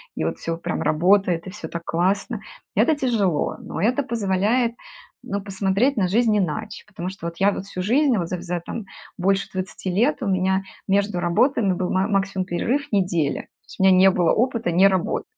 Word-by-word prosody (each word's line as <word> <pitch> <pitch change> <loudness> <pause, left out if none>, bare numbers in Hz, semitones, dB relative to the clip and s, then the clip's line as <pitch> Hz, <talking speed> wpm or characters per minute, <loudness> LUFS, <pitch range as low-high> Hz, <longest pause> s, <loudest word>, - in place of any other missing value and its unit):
и - - -2
вот - - -2
всё 165 0 -3
прям - - -3
работает, 180 +1 +2
и - - -6
всё 210 - -7
так 170 0 -6
классно. 185 +4 0 0.3
Это 320 - +3
тяжело, 220 - 0
но - - -6
это 245 +8 +2
позволяет, 230 0 0 0.5
ну, 200 - -3
посмотреть 200 +6 0
на 190 -3 +2
жизнь 220 +3 +2
иначе, 210 +3 -2
потому 185 -3 -5
что 190 -3 -7
вот 170 0 -7
я 200 +1 +3
вот 195 - -5
всю 185 -2 -5
жизнь, 255 +4 +3
вот 175 -3 -1
за 180 0 -4
за 175 -1 -3
там 200 +5 -7 0.3
больше 195 +2 +1
20 185 0 -4
лет, 245 +10 +1
у - - -2
меня 190 0 +1 0.2
между 200 -1 +1
работами 195 +4 +2
был 180 0 -2
ма 190 +1 +1
максимум 195 -2 0
перерыв 250 +11 -1
неделя. 175 -8 0
То - - -32
есть - - -14
у - - +2
меня 190 -1 +6
не 190 +1 +7
было 175 -2 +2
опыта 230 -5 0
не 185 +4 +6
работы. 190 -2 -1
195 Hz, 200 wpm, -23 LUFS, 180-215 Hz, 0.5 s, не